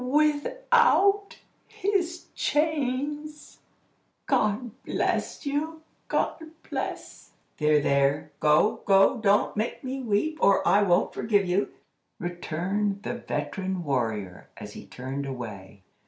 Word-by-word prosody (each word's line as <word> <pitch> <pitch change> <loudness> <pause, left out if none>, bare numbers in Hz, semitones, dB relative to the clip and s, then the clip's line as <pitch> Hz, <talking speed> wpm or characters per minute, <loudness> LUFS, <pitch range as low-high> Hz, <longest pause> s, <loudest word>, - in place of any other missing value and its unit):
without 400 - +3 0.3
his 360 -3 -1
chains? 295 0 -2 0.7
God 215 +3 +1
bless - - -1
you! 310 +3 -2 0.2
God - - -1 0.3
bless—" - - -6 0.2
"There, 150 0 +4
there! 140 +1 +1
Go! 205 +9 +3
go! 195 +6 +5
Don't 205 -2 +2
make 215 +3 -2
me 265 +1 -4
weep, 255 +8 0
or 200 -1 +4
I 205 - +5
won't 180 -3 +2
forgive 205 -3 +1
you," 180 +3 +1 0.5
returned 190 +3 -2
the - - -3
veteran 185 -2 -3
warrior, 110 - -2
as - - -9
he - - -10
turned 135 +2 -5
away. 105 -6 -8
205 Hz, 110 wpm, -27 LUFS, -, 0.7 s, go